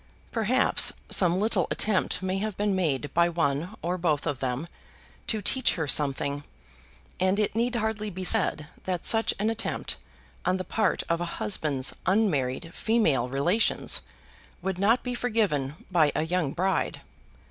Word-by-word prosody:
Perhaps 240 +4 +3 0.2
some 180 -1 +4
little 205 -4 +1
attempt 195 -3 +1
may 185 +1 -1
have 210 -1 -4
been 205 -1 0
made 145 -6 -1
by 170 +1 +3
one 165 +3 -1
or 180 +2 -2
both 155 -4 0
of 145 -5 -2
them 130 +5 -3 0.6
to 215 -2 -2
teach 260 +4 +2
her 160 -3 -2
something, 140 0 +2 0.8
and 185 +2 +2
it 210 -1 0
need 235 +3 0
hardly 220 -2 -2
be 185 -1 -6
said 155 -3 +3 0.2
that 180 -2 -3
such 225 0 +4
an 215 +3 0
attempt 225 - -3 0.5
on 185 +1 +1
the 185 - -4
part 210 0 0
of 170 0 0
a - - -1
husband's 145 -9 +1
unmarried 165 - 0
female 160 - +1
relations 170 - +2 0.6
would 190 -1 -2
not 220 +5 +3
be 250 - -3
forgiven 205 - 0 0.2
by 160 -5 +4
a - - +1
young 165 -3 -1
bride. 190 +5 -1
185 Hz, 155 wpm, -27 LUFS, 150-215 Hz, 0.8 s, some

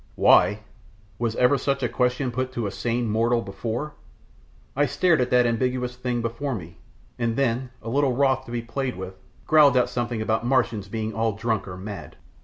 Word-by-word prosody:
"Why?" 105 +1 +5 0.6
Was 115 -2 -1
ever 125 +2 +3
such 140 0 -1
a - - +3
question 125 +1 0
put 130 +1 -2
to 120 -3 -2
a 100 - -2
sane 120 +2 -1
mortal 115 +2 +1
before? 115 +9 -4 0.8
I 145 +2 +2
stared 170 -4 +2
at 125 - 0
that 125 -1 +4
ambiguous 125 +1 -1
thing 125 -1 -2
before 120 +4 -2
me, 85 -4 -9 0.4
and 115 -1 0
then, 130 -1 0
a 115 - -5
little 135 +1 +2
wroth 130 0 +2
to 120 - -10
be 120 -1 -3
played 130 +2 -3
with, 95 0 -6 0.3
growled 150 -4 +6
out 125 - +2
something 120 -1 -2
about 110 +1 0
Martians 115 -5 +1
being 110 +1 -3
all 115 -1 0
drunk 110 -1 -2
or 90 -1 -7
mad. 95 -5 -8
120 Hz, 190 wpm, -24 LUFS, 110-130 Hz, 0.8 s, growled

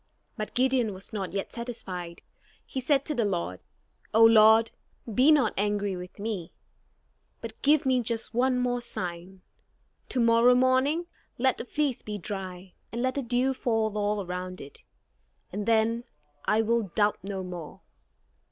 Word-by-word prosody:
But 215 - -6
Gideon 250 -5 +2
was 195 +4 -8
not 195 -5 -3
yet 195 +1 -4
satisfied. 185 -8 -6 0.4
He 265 - -4
said 275 +1 +2
to 300 - -1
the 240 -5 +1
Lord: 170 - -2 0.6
"O 225 0 +8
Lord, 220 0 +6 0.4
be 260 +8 +5
not 280 -8 +4
angry 205 -1 0
with 180 0 -9
me; 200 -5 -4 0.9
but 225 -1 -9
give 295 0 +4
me 260 -1 +3
just 230 -1 -2
one 255 +2 +2
more 245 -1 0
sign. 180 -3 -6 0.7
To 255 - -1
morrow 235 +1 +5
morning 260 +6 +2 0.3
let 260 0 +1
the - - -5
fleece 285 -1 -1
be 210 -1 -5
dry, 185 -1 -6 0.2
and 235 +2 -3
let 260 0 +1
the 280 - -2
dew 250 +2 +1
fall 225 -4 0
all 205 -1 -1
around 180 +1 -5
it, 140 - -11 0.7
and 205 +2 -4
then 230 +1 +2 0.4
I 220 +1 +3
will 230 -2 0
doubt 210 -1 +2
no 195 0 -5
more." 175 -4 -8
225 Hz, 155 wpm, -27 LUFS, 195-250 Hz, 0.9 s, O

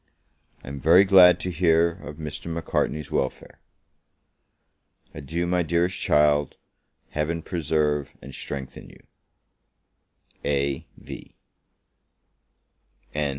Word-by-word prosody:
I - - -14
am 70 +1 -6
very 85 +7 +6
glad 95 -2 +7
to 90 - -3
hear 85 0 +3
of 80 -4 -10
Mr. 75 0 -6
Macartney's 75 -2 -2
welfare. 65 - -3 1.5
Adieu, 80 +5 -3
my 90 0 +1
dearest 85 +4 0
child! 75 -1 +2 0.6
Heaven 80 +2 -2
preserve 75 -4 -1
and 70 - -11
strengthen 65 0 -7
you! - - -18 1.4
A.V. 70 -1 -4
80 Hz, 90 wpm, -24 LUFS, 70-85 Hz, 1.5 s, glad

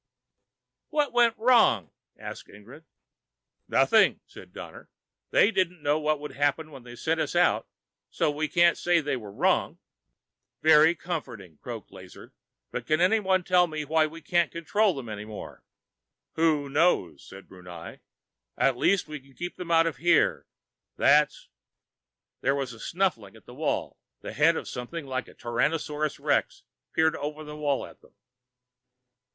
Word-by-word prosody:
"What 295 -4 0
went 235 -1 +3
wrong?" 220 - +3 0.3
asked - - -9
Ingrid. 120 +10 -15 0.8
"Nothing," - - +4
said - - -14
Donner. - - -11 0.4
"They 215 - +4
didn't 180 -5 -1
know 145 +2 +2
what 155 -1 0
would 150 0 -7
happen 145 +2 -1
when 135 -3 -11
they 120 0 -12
sent 160 +6 -1
us - - -3
out, 175 +1 +2 0.4
so 155 +8 0
we 155 +1 -2
can't 170 +3 +3
say 175 -1 +3
they 145 -3 -2
were 110 -5 -8
wrong." - - +1 0.9
"Very 160 +1 +6
comforting," 120 - -7
croaked - - -8
Lazar. - - -13 0.4
"But 120 -1 -5
can 155 +1 +2
someone 190 0 +2
tell 180 -1 +3
me 155 -2 -5
why 155 +1 +2
we 165 +2 -11
can't 170 0 +1
control 190 +3 +1
them 135 -4 -7
any 105 -1 -6
more?" 105 0 -10 0.7
"Who 155 -3 +1
knows?" 145 - +1
said 95 0 -13
Brunei. 90 -3 -11 0.6
"At 135 -2 +2
least 195 +7 +2
we 150 -1 -7
can 135 0 -22
keep 175 0 -6
them 180 -2 -8
out 165 0 +4
of 165 -5 -2
here. 170 +3 +2 0.5
That's 150 +1 +3 0.5
" - - -63
There 135 +2 +1
was 135 -3 -3
a 115 - -13
snuffling 165 - -2
at - - -18
the - - -12
wall. - - -2 0.2
The - - -7
head - - +3
of - - -6
something 140 +6 -6
like 130 -1 -4
a - - -16
Tyrannosaurus 150 +4 -2
Rex - - 0 0.3
peered 160 0 +2
over 150 +2 -5
the 150 0 -9
wall 145 -3 -1
at - - -16
them. - - -23
150 Hz, 160 wpm, -27 LUFS, 130-170 Hz, 0.9 s, Very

